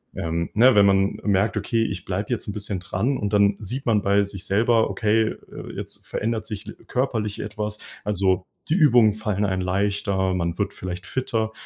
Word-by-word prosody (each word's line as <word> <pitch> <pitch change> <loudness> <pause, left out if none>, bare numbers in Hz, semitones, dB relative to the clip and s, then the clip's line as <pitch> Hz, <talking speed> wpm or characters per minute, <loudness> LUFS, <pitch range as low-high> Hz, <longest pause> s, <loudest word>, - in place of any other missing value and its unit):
ähm, 85 0 -2
ne, 125 +4 +6
wenn 100 -1 +7
man 95 0 +3
merkt: 100 +1 +2
„Okay, 115 -2 +1
ich 90 -5 -4
bleibe 100 +3 -3
jetzt 120 -2 -2
'n 105 - -3
bisschen 100 -2 -4
dran“ 115 +10 -1
und 100 -1 -2
dann 100 0 +4
sieht 125 +6 -5
man 105 -3 +3
bei 100 +1 +3
sich 100 -2 -7
selber: 110 +2 +3
„Okay, 110 +3 +2
äh, - - -9
jetzt - - -7
verändert 110 0 -2
sich 105 -3 -7
l - - -8
körperlich 110 -5 -1
etwas.“ 105 0 -4 0.2
Also, 95 -2 +1 0.2
die 155 - +3
Übungen 125 - +5
fallen 105 -1 -1
einem 95 -1 -1
leichter, 95 0 0
man 85 -1 -2
wird 100 0 -1
vielleicht 90 0 -6
fitter. 115 -4 -1
105 Hz, 190 wpm, -24 LUFS, 95-110 Hz, 0.2 s, wenn